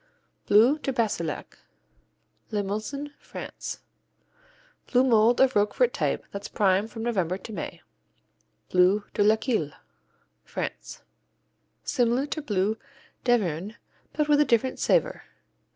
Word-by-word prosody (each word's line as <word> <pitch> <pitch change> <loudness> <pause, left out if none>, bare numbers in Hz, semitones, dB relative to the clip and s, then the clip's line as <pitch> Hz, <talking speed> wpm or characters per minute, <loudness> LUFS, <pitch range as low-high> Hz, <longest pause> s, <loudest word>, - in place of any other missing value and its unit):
Bleu 240 +9 +5
de 275 - -2
Bassillac 215 -10 -2 0.9
Limousin, 215 +8 -3
France - - -7 1.1
Blue 250 0 +4
mold 235 -1 +4
of 265 0 +4
Roquefort 210 - +2
type - - -1
that's 200 0 -6
prime 195 +1 +2
from 225 0 -7
November 190 -7 0
to 215 +3 -10
May. - - -6 0.9
Bleu 185 +3 +4
de - - 0
Laqueuille 215 - +1 0.7
France - - -6 0.8
Similar 245 0 +1
to 310 +1 -4
Bleu 210 -4 0 0.5
d'Auvergne, 205 -4 +1 0.4
but 300 -1 0
with 295 -1 +4
a - - +4
different 255 0 +1
savor. - - +2
220 Hz, 110 wpm, -26 LUFS, 200-260 Hz, 1.1 s, Bleu